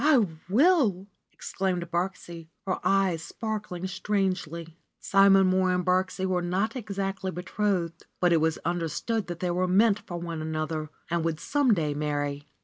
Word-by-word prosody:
"I 280 Hz, -7 st, +5 dB, 0.2 s
will 235 Hz, -, +3 dB
!" -, -, -53 dB
exclaimed 185 Hz, -2 st, -3 dB
Birksie, 170 Hz, -2 st, -3 dB, 0.2 s
her 185 Hz, -, -1 dB
eyes 195 Hz, -4 st, +2 dB
sparkling 205 Hz, 0 st, -5 dB
strangely. 185 Hz, -4 st, -2 dB, 0.2 s
Simon 195 Hz, -1 st, +5 dB
Mohr 185 Hz, -1 st, +2 dB
and 180 Hz, -1 st, -1 dB
Birksie 185 Hz, +1 st, +1 dB
were 185 Hz, -1 st, 0 dB
not 190 Hz, +7 st, -1 dB
exactly 195 Hz, -4 st, -3 dB
betrothed, 180 Hz, -1 st, -2 dB
but 175 Hz, -1 st, +4 dB
it 165 Hz, -, +3 dB
was 160 Hz, 0 st, +1 dB
understood 175 Hz, +6 st, -1 dB
that 175 Hz, -1 st, -6 dB
they 180 Hz, -1 st, 0 dB
were 180 Hz, +1 st, +1 dB
meant 205 Hz, +3 st, +4 dB
for 175 Hz, -, -7 dB
one 170 Hz, -2 st, -5 dB
another 155 Hz, 0 st, -3 dB, 0.2 s
and 170 Hz, -1 st, +1 dB
would 165 Hz, -1 st, -1 dB
some 275 Hz, -6 st, +2 dB
day 155 Hz, -4 st, -1 dB
marry. 145 Hz, -1 st, -2 dB
185 Hz, 155 wpm, -27 LUFS, 170-195 Hz, 0.2 s, I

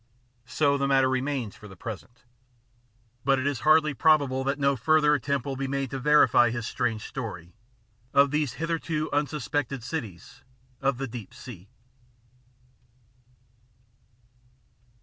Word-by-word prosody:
So 140 Hz, +1 st, +1 dB
the 140 Hz, -, +1 dB
matter 135 Hz, -1 st, +4 dB
remains 130 Hz, -4 st, -2 dB
for 105 Hz, -, -13 dB
the 95 Hz, -, -12 dB
present. 115 Hz, +5 st, -9 dB, 1.0 s
But 135 Hz, -1 st, +3 dB
it 130 Hz, -, -2 dB
is 140 Hz, -4 st, -1 dB
hardly 155 Hz, +1 st, +4 dB
probable 140 Hz, -1 st, +3 dB
that 140 Hz, +1 st, 0 dB
no 140 Hz, -1 st, +2 dB
further 150 Hz, +4 st, +3 dB
attempt 140 Hz, -1 st, -1 dB
will 140 Hz, -1 st, -3 dB
be 135 Hz, +1 st, -3 dB
made 135 Hz, -1 st, -2 dB
to 135 Hz, -, -3 dB
verify 150 Hz, -4 st, +5 dB
his 120 Hz, 0 st, -4 dB
strange 115 Hz, -3 st, -2 dB
story 90 Hz, -10 st, -7 dB, 0.6 s
of 140 Hz, 0 st, +4 dB
these 150 Hz, -4 st, 0 dB
hitherto 165 Hz, -1 st, -2 dB
unsuspected 145 Hz, -3 st, -2 dB
cities 110 Hz, -, -7 dB, 0.4 s
of 135 Hz, -2 st, +1 dB
the 135 Hz, +1 st, -3 dB
deep 115 Hz, -4 st, -9 dB
sea. 100 Hz, -6 st, -11 dB
135 Hz, 130 wpm, -26 LUFS, 120-145 Hz, 1.0 s, verify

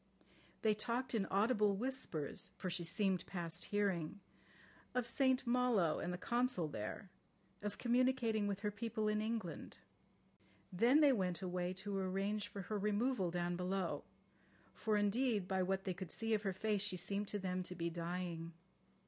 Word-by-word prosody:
They 215 Hz, -1 st, +5 dB
talked 235 Hz, +5 st, -2 dB
in 210 Hz, -4 st, +1 dB
audible 210 Hz, 0 st, +3 dB
whispers 225 Hz, -, -3 dB
(for 185 Hz, -, -3 dB
she 175 Hz, 0 st, 0 dB
seemed 185 Hz, +1 st, +1 dB
past 175 Hz, -1 st, -4 dB
hearing) 200 Hz, -4 st, 0 dB, 0.8 s
of 250 Hz, -2 st, +2 dB
St 260 Hz, +1 st, +3 dB
Malo 235 Hz, -9 st, +3 dB
and 175 Hz, -, -2 dB
the 180 Hz, -, -2 dB
Consul 240 Hz, -4 st, +1 dB
there, 110 Hz, -, -5 dB, 0.5 s
of 205 Hz, 0 st, -3 dB
communicating 240 Hz, -3 st, +2 dB
with 200 Hz, -1 st, -2 dB
her 210 Hz, -1 st, 0 dB
people 220 Hz, +1 st, -2 dB
in 210 Hz, 0 st, +2 dB
England. 215 Hz, -7 st, -3 dB, 1.0 s
Then 245 Hz, -, +5 dB
they 285 Hz, -3 st, +7 dB
went 185 Hz, -5 st, 0 dB
away 180 Hz, -1 st, -1 dB
to 195 Hz, +2 st, -4 dB
arrange 195 Hz, +2 st, -1 dB
for 200 Hz, -, -6 dB
her 210 Hz, +3 st, -2 dB
removal 210 Hz, -1 st, +1 dB
down 175 Hz, 0 st, -1 dB
below, 180 Hz, 0 st, -1 dB, 0.7 s
for 215 Hz, -1 st, +1 dB
indeed 205 Hz, -1 st, +2 dB
by 190 Hz, -1 st, +1 dB
what 190 Hz, +1 st, 0 dB
they 190 Hz, -, -1 dB
could 185 Hz, -1 st, -7 dB
see 225 Hz, 0 st, 0 dB
of 215 Hz, -, +2 dB
her 195 Hz, -2 st, 0 dB
face 210 Hz, +1 st, 0 dB
she 200 Hz, -3 st, -1 dB
seemed 200 Hz, +4 st, -1 dB
to 205 Hz, -, -2 dB
them 185 Hz, -2 st, -1 dB
to 180 Hz, 0 st, -3 dB
be 170 Hz, 0 st, -2 dB
dying. 170 Hz, -1 st, -3 dB
200 Hz, 165 wpm, -38 LUFS, 180-225 Hz, 1.0 s, they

